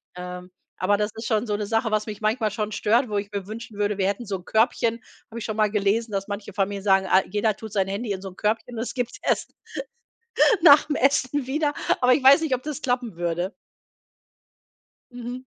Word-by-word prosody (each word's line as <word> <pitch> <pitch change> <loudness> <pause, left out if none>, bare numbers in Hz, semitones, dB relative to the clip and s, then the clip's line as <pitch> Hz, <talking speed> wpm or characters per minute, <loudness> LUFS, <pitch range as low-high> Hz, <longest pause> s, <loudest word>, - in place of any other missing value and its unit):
Ähm, 180 0 -7 0.3
aber 205 +2 +2
das 210 +1 -1
ist 225 +1 -5
schon 220 0 +1
so 210 - 0
'ne 210 0 -2
Sache, 225 0 0
was 215 +1 0
mich 210 -1 -6
manchmal 215 0 0
schon 210 0 -3
stört, 230 +5 +2
wo 205 -1 -2
ich 200 0 -3
mir 200 -2 -4
wünschen 220 0 -8
würde, 205 -1 0
wir 190 -1 +1
hätten 205 +4 -2
so 200 -2 -3
'n 180 - -14
Körbchen, 230 0 +1 0.3
habe 230 - -6
ich - - -6
schon 215 - -3
mal 215 -1 +2
gelesen, 215 +2 +1
dass 195 0 -2
manche 205 0 -5
Familien 195 0 -2
sagen, 195 -1 +3
ah, 190 - +6
jeder 210 +1 +1
tut 220 0 -9
sein 195 -2 +1
Handy 205 +3 -3
in 190 -1 -3
so 195 - -6
'n 180 - -16
Körbchen 225 +3 -1
und 225 - -3
es 240 - -4
gibt 245 -1 -3
erst - - -1 1.1
nach 295 -3 +8
dem 295 -1 -2
Essen 275 0 +1
wieder. 290 +2 0 0.3
Aber 250 0 +5
ich 265 - +1
weiß 280 +5 +8
nicht, 300 -5 +1
ob 250 - -8
das 300 -1 -5
klappen 245 -7 -2
würde. 175 +3 -2 1.6
Mhm. 245 +1 -7
215 Hz, 225 wpm, -24 LUFS, 200-245 Hz, 1.6 s, nach